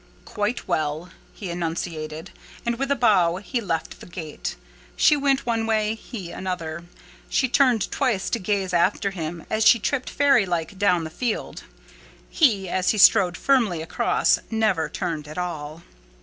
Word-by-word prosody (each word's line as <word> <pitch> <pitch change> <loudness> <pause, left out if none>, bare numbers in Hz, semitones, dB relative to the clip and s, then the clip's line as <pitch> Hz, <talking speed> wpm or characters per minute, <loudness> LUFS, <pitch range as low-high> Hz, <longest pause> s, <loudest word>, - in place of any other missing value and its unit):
"Quite 210 +3 -3
well," 155 +3 -2 0.2
he 190 -4 -7
enunciated; 165 -1 -4 0.3
and, 235 0 -1
with 275 0 -1
a 280 - +3
bow, 195 -9 +3
he 220 +6 -3
left 165 -6 -3
the - - -12
gate. 165 -4 -6 0.4
She 300 - +5
went 275 -1 +1
one 225 -2 0
way; 215 -1 +1
he 215 -5 -8
another. 170 -3 -5 0.4
She 260 - +2
turned 250 -5 +2
twice 210 -7 0
to 235 - 0
gaze 190 -1 -1
after 185 +3 +2
him 165 -2 -6
as 220 0 0
she 230 +2 +7
tripped 255 +4 -2
fairy 275 -8 +3
like 175 +2 -3
down 180 -4 +3
the 160 - -6
field; 240 +5 -3 0.7
he, 215 - +3
as 185 +1 0
he 215 - +2
strode 185 -3 +6
firmly 225 -12 +2
across, 165 - +1
never 215 -7 +1
turned 155 -3 -4
at 155 - -9
all. 165 -2 -5
190 Hz, 160 wpm, -24 LUFS, 170-225 Hz, 0.7 s, she